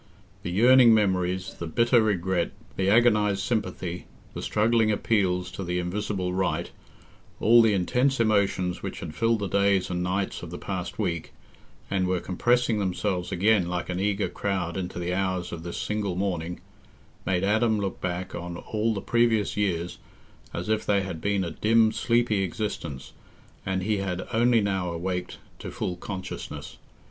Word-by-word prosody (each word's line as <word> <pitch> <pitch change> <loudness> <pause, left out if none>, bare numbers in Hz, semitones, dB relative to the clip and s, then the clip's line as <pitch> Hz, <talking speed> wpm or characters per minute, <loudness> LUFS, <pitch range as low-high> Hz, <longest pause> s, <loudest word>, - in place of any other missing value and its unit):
The - - -4
yearning 120 +4 +6
memories, 95 -2 0
the 85 - -6
bitter 115 +7 +3
regret, 95 -4 0 0.2
the 95 0 +1
agonized 105 -3 +4
sympathy, 90 -6 -3 0.3
the - - -5
struggling 110 0 +2
appeals 95 -4 +1
to 95 - -5
the 90 0 -2
Invisible 90 0 -2
Right—all 105 +4 0
the 110 -3 +4
intense 125 +8 +1
emotions 100 -5 +1
which - - -6
had 75 - -6
filled 115 0 +2
the 100 -2 -3
days 100 0 +2
and 90 0 -1
nights 95 +2 -2
of 85 - -7
the 90 - -6
past 95 -3 -5
week, 85 -6 -2 0.6
and 95 -1 +1
were 90 -1 +1
compressing 120 +5 +1
themselves 95 -1 -1
again 100 -1 +3
like 90 0 -3
an 90 0 -2
eager 100 +1 0
crowd 95 -4 -2
into 90 -2 -4
the 90 0 -2
hours 95 -2 -1
of 85 - -6
this 85 0 -6
single 105 -3 -2
morning, 90 -3 -2 0.6
made 95 -1 0
Adam 110 +2 +2
look 100 -1 -3
back 90 0 -3
on 85 0 -5
all 110 +3 -1
the 100 - -3
previous 115 -2 +2
years 90 -4 -1 0.5
as - - -5
if 110 0 +1
they 100 -1 +2
had 85 -4 -6
been 100 -1 +1
a 85 - -3
dim 110 0 +3
sleepy 115 -3 +1
existence, 85 -7 -4 0.5
and 95 -1 -1
he 105 +1 +1
had 95 -2 -3
only 120 0 +4
now 95 -3 -1
awaked 90 +1 -3 0.2
to - - -6
full 90 - -3
consciousness. 95 +1 -7
95 Hz, 160 wpm, -26 LUFS, 90-110 Hz, 0.6 s, yearning